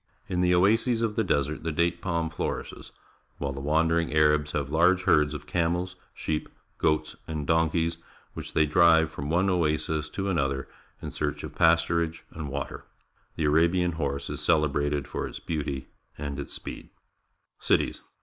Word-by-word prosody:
In 90 -1 -1
the 90 0 +4
oases 115 +6 +3
of 110 -2 -1
the 110 - +2
desert 75 -5 0
the 80 +1 -2
date 85 +2 0
palm 85 -3 -1
flour - - -2
ishes, - - -11 0.5
while 70 -1 -3
the 70 - -6
wandering 80 +3 +2
Arabs 75 -1 +3
have 70 -1 -2
large 90 +4 +4
herds 75 0 +3
of 75 - -7
camels, 90 +2 -1 0.2
sheep, 75 -1 -3 0.3
goats, 75 0 +1
and 75 -2 -3
donkeys, 80 +1 +1 0.3
which - - -7
they 80 - +4
drive 80 +1 +5
from 70 +1 -5
one 90 +4 +2
oasis 80 -3 0
to 95 +4 -3
another 70 -7 0 0.4
in - - -4
search 75 -2 -3
of - - -6
pasturage 85 0 +2
and 75 -3 -6
water. 70 0 -5 0.5
The 80 - -2
Arabian 85 +4 +3
horse 70 -3 -3
is - - -5
celebrated 75 -3 +1
for - - -3
its - - -8
beauty 70 -5 -4 0.3
and 70 -1 -4
its 70 - -6
speed. - - -8 0.7
Cities. - - +1
80 Hz, 165 wpm, -27 LUFS, 75-85 Hz, 0.7 s, drive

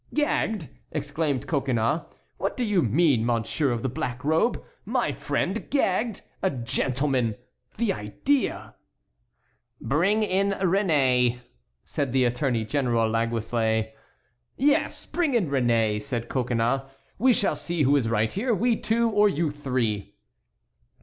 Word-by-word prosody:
"Gagged!" 220 - 0 0.2
exclaimed 145 -2 -2
Coconnas; 135 -1 0 0.4
"what - - -2
do 250 - 0
you 205 -5 +2
mean, 135 -1 +3
monsieur 120 +5 0
of 120 -2 -2
the - - +1
black 125 0 -4
robe? 160 +10 +2 0.2
My - - 0
friend - - -2
gagged? 225 -4 0 0.2
A 190 - +2
gentleman! 130 - 0 0.4
the 215 -3 +1
idea!" 240 - -1 1.1
"Bring 180 - +2
in 200 0 +1
Réné," 145 - +2 0.4
said 140 -4 -3
the 130 -1 +3
Attorney 120 -2 0
General 120 -3 +1
Laguesle. 115 -1 0 0.7
"Yes; 285 +2 +1
bring 320 -7 0
in 185 -11 +1
Réné," 115 -5 +2
said 115 +2 -4
Coconnas; 120 0 0 0.4
"we 255 +4 +5
shall 205 - +2
see 170 -3 -1
who 140 +2 +4
is 125 -5 +1
right 110 0 +1
here, 230 +3 0
we 235 +2 +2
two 230 +1 +1
or 210 -1 +4
you 160 -3 0
three." 125 -8 -2
140 Hz, 130 wpm, -25 LUFS, 120-195 Hz, 1.1 s, we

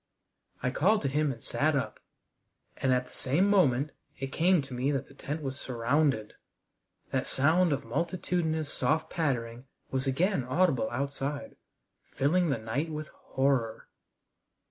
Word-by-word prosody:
I 125 - +1
called 195 +10 +3
to - - +1
him 145 +1 +1
and 115 -3 -9
sat 155 +1 +1
up, 135 - -2 0.8
and 135 - +1
at 125 0 +2
the 125 - -18
same 155 +10 +2
moment 150 -8 +3 0.3
it 135 0 -4
came 175 0 +3
to 135 - -9
me 125 +3 0
that 135 -3 -2
the - - -16
tent 145 +3 -5
was 135 0 -3
surrounded. 125 -2 +1 0.8
That - - 0
sound 160 +5 +3
of 140 -3 -1
multitudinous 160 +2 -1
soft 155 +1 0
pattering 125 -6 -1 0.3
was 135 +1 0
again 165 +4 +1
audible 130 -3 +2
outside, 140 +2 -3 0.6
filling 165 +5 +2
the 140 - +1
night 115 +9 -2
with 155 0 -5
horror. 130 -5 -1
140 Hz, 145 wpm, -29 LUFS, 130-160 Hz, 0.8 s, called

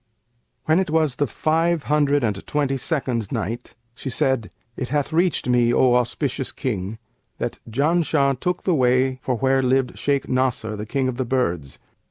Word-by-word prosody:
When 160 +3 +4
it 190 - -1
was 155 -4 +1
the 145 - +1
Five 165 +3 +1
Hundred 145 -2 +2
and 105 -3 -2
Twenty 145 -2 0
second 130 - -2
Night, 115 +2 -4 0.2
She 135 - -6
said, 130 -3 0 0.3
It 125 - -4
hath 145 +2 -1
reached 175 -2 +1
me, 120 -1 +3
O 125 0 +4
auspicious 125 +2 0
King, 105 -4 -3 0.4
that - - -4
"Janshah 140 0 +2
took 180 +4 -1
the 185 - +2
way 130 -1 +2
for 130 - -1
where 135 +2 +2
lived 130 0 +1
Shaykh 140 -1 0
Nasr, 125 -4 0
the 105 +1 -6
King 135 +2 0
of 125 -2 -3
the 130 - -1
Birds. 90 - -1
130 Hz, 170 wpm, -22 LUFS, 120-145 Hz, 0.4 s, When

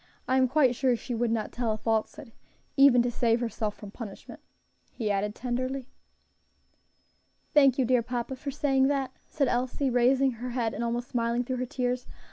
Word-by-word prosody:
I 260 - +2
am 260 -1 +4
quite 260 -1 +3
sure 255 0 +1
she 245 +2 -6
would 235 0 0
not 225 -2 -1
tell 235 -3 -1
a - - -4
falsehood 225 +5 -2 0.4
even 270 -3 +6
to 245 - -1
save 235 0 +1
herself 220 -3 -3
from 205 -2 -10
punishment," 210 -3 -9 0.5
he 215 -4 -2
added 205 +1 -1
tenderly. 255 +1 -3 1.6
"Thank 275 -4 +5
you, 260 - +2
dear 250 0 +3
papa, 245 +2 -4
for 280 +2 -6
saying 270 -1 +2
that," 275 -2 -1 0.2
said 285 -4 0
Elsie, 255 +2 0
raising 260 +2 +3
her 245 +1 -6
head 235 -2 -1
and - - -3
almost 240 +1 -2
smiling 235 0 0
through 255 +1 -3
her 255 0 -3
tears. 250 0 -2
245 Hz, 180 wpm, -28 LUFS, 235-265 Hz, 1.6 s, even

